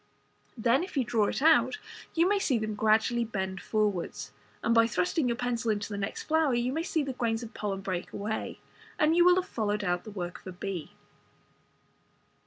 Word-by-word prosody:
Then 235 +5 +3
if 365 - -7
you 265 - +3
draw 215 -2 +1
it - - -2
out 325 +6 +5 0.4
you 335 +2 +4
may 405 +1 +2
see 275 -10 +1
them 215 -1 -2
gradually 220 +3 +2
bend 190 -4 -3
forwards, 210 -5 -1 0.3
and 230 - +2
by 230 0 +5
thrusting 230 - 0
your 235 - -1
pencil 240 -1 -1
into 205 -1 -1
the 205 - -4
next 200 +1 -3
flower 315 -4 +2
you 240 +2 0
may 320 - -1
see 325 -2 0
the 275 -1 -3
grains 230 -2 -1
of 230 0 -9
pollen 195 -2 -3
bread 185 -2 -3
away, 215 +2 -4 0.4
and 305 +2 +3
you 345 - +6
will 360 0 +7
have 370 0 0
followed 210 -2 -1
out 175 -2 0
the - - -9
work 180 -4 -5
of - - -15
a - - -5
bee. 180 -3 -5
225 Hz, 200 wpm, -29 LUFS, 205-265 Hz, 0.4 s, will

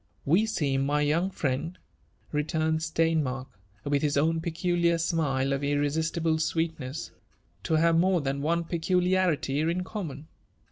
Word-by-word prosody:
''We 200 +9 +3
seem, 135 -8 0
my 145 +2 +1
young 160 +6 +1
friend," 160 +1 -2 0.5
returned 160 +1 0
Steini^ark, 160 -5 0 0.4
with 145 -1 0
bis 145 -1 +1
own 160 +3 +2
peculiar 170 0 +1
smile 140 -5 0
of 140 +1 -2
irresistible 160 +3 0
sweetness, 160 -3 -2 0.3
'' - - -38
to 160 - +1
have 165 +1 +4
more 185 0 +3
than 140 -1 -2
one 170 +3 +1
p^o 170 +2 0
liarity 180 -6 +1
in 180 +2 -1
common. 160 -8 -6
160 Hz, 140 wpm, -27 LUFS, 145-170 Hz, 0.5 s, have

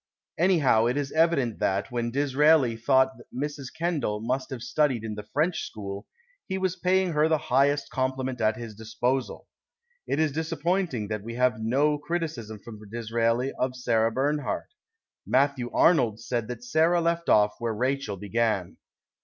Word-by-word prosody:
Anyhow, 155 -11 +4
it 125 +3 0
is 140 -1 -2
evident 155 -8 +2
that, 100 +6 0
when 120 -1 -1
Disraeli 140 -1 +3
thought 130 +3 +3 0.2
Mrs. 140 0 -5
Kendal 155 -11 -1
must 125 +4 -2
have 125 -3 -6
studied 130 -2 +1
in 110 -1 -4
the 105 - -6
French 160 +3 +1
school, 100 -1 -7 0.4
he 190 - -2
was 185 -1 -1
paying 185 0 +1
her 150 0 +3
the 160 -1 +3 0.2
highest 140 +1 +3
compliment 130 -1 -2
at 110 0 +2
his 115 -2 -7
disposal. 120 +4 -2 0.6
It 145 - 0
is 155 -2 +2
disappointing 160 - -1
that 105 -1 -3
we 115 +3 -7
have 125 -3 +2
no 145 +6 +2
criticism 150 -10 -4
from 110 +1 -11
Disraeli 115 +3 0
of 125 0 0
Sarah 115 -3 +1
Bernhardt. 145 - -2 0.5
Matthew 135 -2 +1
Arnold 125 -11 +3
said 115 -1 -3
that 120 -1 -7
Sarah 160 +7 +3
left 170 0 0
off 105 0 +4
where 115 -1 -1
Rachel 130 -3 -1
began. 105 -2 -1
130 Hz, 155 wpm, -26 LUFS, 115-150 Hz, 0.6 s, Anyhow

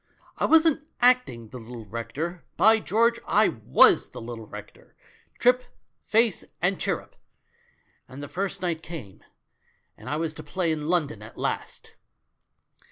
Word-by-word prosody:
I - - +2
wasn't 320 -2 +4
acting 245 - +2
the 125 - -9
little 115 0 -9
rector 150 - -5
— - - -45
by 220 +1 +6
George, 230 +3 +2
I 210 +1 +4
was 110 - +4
the - - -9
little 115 -1 -8
rector, - - -12 0.4
trip, 250 +1 +4 0.4
face 225 -2 +2 0.2
and 180 +2 +1
chirrup. - - -2 0.9
And 135 +3 -9
the - - -6
first 190 +2 -3
night 170 -3 -1
came, 140 - -9 0.7
and - - -10
I 150 - -1
was 160 0 -2
to 155 - -9
play 165 +3 -1
in 150 -1 -3
London 155 - 0
at 110 - -12
last - - -4
165 Hz, 150 wpm, -26 LUFS, -, 0.9 s, by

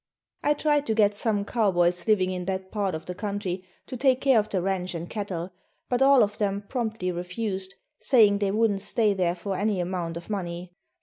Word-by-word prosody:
I 295 +1 +2
tried 295 -1 +1
to 220 - +1
get 210 -2 +4
some 205 -1 -1
cowboys 180 -5 +1
living 190 -4 +3
in 180 -1 -4
that 190 0 -4
part 200 -5 -1
of 160 - -7
the 180 - -5
country 195 -2 -4 0.2
to 255 - -7
take 260 0 +3
care 265 -4 +4
of 215 - -2
the 190 - 0
ranch 185 -1 -2
and 170 +1 -5
cattle, 185 -4 -4 0.4
but 245 0 0
all 270 -1 +7
of 205 0 -3
them 200 -1 -1
promptly 220 -7 -2
refused, 190 +2 -4 0.2
saying 210 -6 +4
they 200 -1 +1
wouldn't 210 -1 +1
stay 215 0 +2
there 180 -2 0
for 190 +2 -4
any 205 0 0
amount 175 -2 -3
of 170 - -9
money. 175 -3 -5
200 Hz, 200 wpm, -26 LUFS, 180-220 Hz, 0.4 s, all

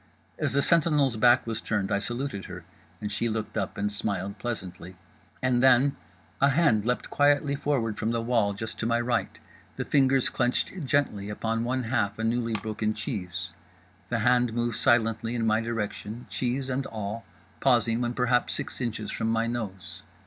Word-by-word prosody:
As - - 0
the 140 0 +3
sentinel's 150 -6 +3
back 120 +3 +5
was 115 0 -3
turned 105 -2 -1
I 100 - +2
saluted 120 -2 -4
her, - - -8 0.4
and 105 -1 -4
she 115 +3 -1
looked 110 -1 -3
up 100 -4 -2
and 105 +1 -1
smiled 100 -1 -2
pleasantly. 95 -5 -6 0.5
And 125 -1 +3
then—a 120 - +2
hand 135 -8 +3
leapt 125 - -1
quietly 145 0 +3
forward 130 -7 -1
from 110 - 0
the 115 0 0
wall, 115 -3 +1
just 110 +3 -6
to 110 - -1
my 115 0 +2
right; 120 0 -1 0.4
the - - -3
fingers 135 -2 +3
clenched 130 +7 -1
gently 120 -8 0
upon 115 +2 -1
one 130 +2 -1
half 110 -4 0
a 110 - -3
newly 115 0 0
broken 110 0 -2
cheese; 95 -6 -4 0.6
the - - 0
hand 125 -2 +3
moved 120 -1 -1
silently 115 0 +2
in 115 -1 0
my 110 0 +3
direction, 115 0 -4
cheese 130 +1 -1
and 135 +1 -2
all, 110 +1 -5 0.4
pausing 120 -2 +3
when 120 0 -1
perhaps 125 0 +1
six - - -5
inches 110 -3 -3
from 110 - -2
my 115 0 +1
nose. 100 -7 -5
115 Hz, 170 wpm, -27 LUFS, 105-125 Hz, 0.6 s, back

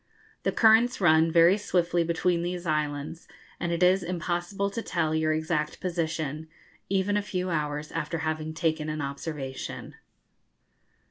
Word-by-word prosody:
The - - 0
currents 225 +2 +4
run 160 -3 +4
very 170 +4 +6
swiftly 175 -3 +1
between 170 +1 +1
these 175 +1 -4
islands, 150 0 -2 0.3
and 175 - -2
it 170 +1 +1
is 185 +2 +5
impossible 175 +3 -2
to 230 - -3
tell 160 -7 -1
your 160 0 +1
exact 155 -1 -1
position, 160 -4 -3 0.4
even 195 +1 +1
a - - +1
few 185 -2 -3
hours 150 -1 -2
after 165 0 -3
having 155 0 -3
taken 155 -2 -1
an 155 0 -3
observation. 140 -1 -5
165 Hz, 140 wpm, -27 LUFS, 155-180 Hz, 0.4 s, very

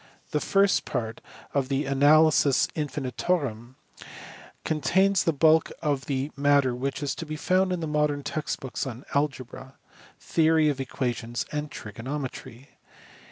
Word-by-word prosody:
The 150 - +1
first 195 +4 +2
part 115 -5 -4 0.3
of 135 -2 0
the 140 +1 0
Analysis 145 0 +4
Infinitorum 135 -3 -2 0.9
contains 190 +5 +2
the 165 - +2
bulk 160 +2 +4
of 145 -4 -1
the 140 +1 -2
matter 140 -2 +3
which 135 +4 -3
is 140 -1 -1
to 165 - -6
be 155 - -4
found 185 +4 +1
in 170 -3 -2
modern 150 -1 0
text 145 +1 -3
books 135 +1 -4
on 125 +1 -8
algebra, 135 -2 -3 0.4
theory 160 -1 +3
of 140 -2 -2
equations, 120 -2 -3
and 150 0 -3
trigonometry. 130 +1 -7
145 Hz, 130 wpm, -26 LUFS, 130-155 Hz, 0.9 s, Analysis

